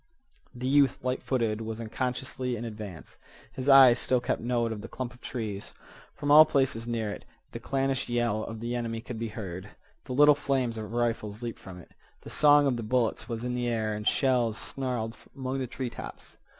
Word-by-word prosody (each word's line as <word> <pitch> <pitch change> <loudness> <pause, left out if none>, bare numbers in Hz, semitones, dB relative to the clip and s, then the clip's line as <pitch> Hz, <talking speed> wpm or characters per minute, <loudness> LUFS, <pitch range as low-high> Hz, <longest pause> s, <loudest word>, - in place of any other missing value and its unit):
The 125 +1 -5
youth, 140 -1 +4
light 125 0 -1
footed, 115 -4 -1
was 110 0 -5
unconsciously 125 +2 -3
in 120 +1 -5
advance. 105 -6 -8 0.3
His 130 +2 -3
eyes 130 -3 +8
still 130 - +1
kept 120 - -2
note 120 -1 0
of 105 -2 -5
the - - -7
clump 125 -2 -5
of 125 - -19
trees. 105 -5 -5 0.4
From 145 0 -1
all 155 +1 +11
places 135 -6 0
near 115 -3 -2
it - - -8 0.3
the - - -6
clannish 135 -2 -1
yell 120 -3 0
of 115 -1 -6
the 120 +1 -3
enemy 115 -2 -2
could 115 0 -7
be 115 - -2
heard. 100 -3 -7 0.4
The 130 - -5
little 145 +3 +7
flames 135 -4 -1
of 110 -1 -6
rifles 115 -2 -2
leaped 115 -1 -5
from 95 -2 -10
it. 90 - -14 0.3
The - - -9
song 145 -1 +6
of 130 -3 +1
the - - -3
bullets 115 +1 0
was 115 0 -3
in 125 0 -2
the 125 0 -1
air 110 -2 0
and 105 0 -4
shells 125 -5 +2
snarled 125 -4 -3 0.2
among 135 0 -3
the 130 - -2
treetops. 125 0 -7
120 Hz, 200 wpm, -28 LUFS, 110-130 Hz, 0.4 s, all